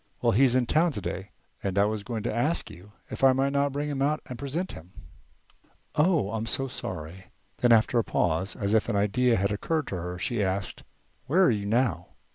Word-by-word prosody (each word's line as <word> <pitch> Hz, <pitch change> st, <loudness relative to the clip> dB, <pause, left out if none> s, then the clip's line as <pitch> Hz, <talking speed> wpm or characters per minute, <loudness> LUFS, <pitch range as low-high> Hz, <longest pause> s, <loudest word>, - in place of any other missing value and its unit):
Well, -, -, +2 dB
he's 125 Hz, +3 st, +4 dB
in 130 Hz, -1 st, +3 dB
town 160 Hz, +6 st, +2 dB
today 95 Hz, -1 st, -4 dB, 0.3 s
and 95 Hz, 0 st, -3 dB
I 100 Hz, -, +5 dB
was 105 Hz, 0 st, -2 dB
going 115 Hz, -1 st, -4 dB
to -, -, -2 dB
ask 145 Hz, +9 st, -1 dB
you 95 Hz, +4 st, -14 dB, 0.2 s
if -, -, -6 dB
I 135 Hz, -1 st, +7 dB
might 135 Hz, +1 st, 0 dB
not 140 Hz, 0 st, +1 dB
bring 145 Hz, +2 st, -2 dB
him 140 Hz, -2 st, -3 dB
out 150 Hz, +2 st, +1 dB
and 125 Hz, -2 st, -8 dB
present 155 Hz, +8 st, -3 dB
him." 85 Hz, +3 st, -12 dB, 1.0 s
"Oh! 150 Hz, -, +2 dB
I'm 110 Hz, 0 st, -3 dB
so 135 Hz, +3 st, 0 dB
sorry." 90 Hz, -6 st, -7 dB, 0.3 s
Then 120 Hz, -, +3 dB
after 115 Hz, +1 st, +4 dB
a -, -, +1 dB
pause, 90 Hz, +1 st, 0 dB
as 100 Hz, 0 st, -1 dB
if 110 Hz, +1 st, +2 dB
an 115 Hz, -, 0 dB
idea 115 Hz, +5 st, +2 dB
had 100 Hz, +1 st, 0 dB
occurred 155 Hz, +9 st, -1 dB
to 95 Hz, -, -3 dB
her, 90 Hz, +1 st, -5 dB
she 110 Hz, +4 st, -1 dB
asked: 95 Hz, -1 st, -2 dB, 0.5 s
"Where 175 Hz, +8 st, +4 dB
are 180 Hz, -, +5 dB
you 100 Hz, -2 st, -2 dB
now?" 115 Hz, -5 st, +1 dB
115 Hz, 215 wpm, -27 LUFS, 100-135 Hz, 1.0 s, I